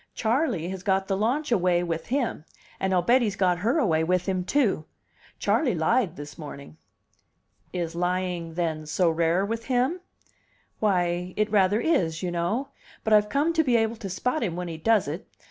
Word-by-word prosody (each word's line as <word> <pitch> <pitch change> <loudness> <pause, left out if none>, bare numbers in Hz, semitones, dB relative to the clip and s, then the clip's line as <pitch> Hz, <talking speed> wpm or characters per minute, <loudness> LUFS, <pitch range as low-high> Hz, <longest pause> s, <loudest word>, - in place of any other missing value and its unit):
Charley 225 - 0
has 190 -1 -5
got 190 0 +1
the 195 - 0
launch 245 +9 0
away 180 -5 +2
with 165 -2 -3
him 250 - -1 0.4
and 190 - 0
I'll 180 -2 +2
bet 250 +6 +4
he's 210 -4 0
got 180 -3 +2
her 235 - +1
away 165 - +2
with 180 +2 +1
him, 185 -2 -1
too. 205 - +1 0.5
Charley 255 - +1
lied 170 +3 +1
this 145 0 -9
morning." 140 - -9 0.9
"Is 170 -2 -3
lying, 175 -1 -2
then, 160 -3 -2
so 165 +2 +2
rare 170 +3 +1
with 230 +2 -4
him?" 260 +8 +1 0.8
"Why, 180 -3 0
it 215 0 +1
rather 205 0 +3
is, 170 - +1
you 180 - -1
know. 205 +11 -1 0.3
But 220 - +2
I've 210 0 +5
come 295 +4 +1
to 320 -1 +3
be 250 -5 +2
able 225 0 0
to 200 -3 -6
spot 250 - -1
him 175 -6 -1
when 180 0 -4
he 165 - -5
does 215 +1 +3
it. 160 +8 -5
190 Hz, 185 wpm, -26 LUFS, 170-230 Hz, 0.9 s, I've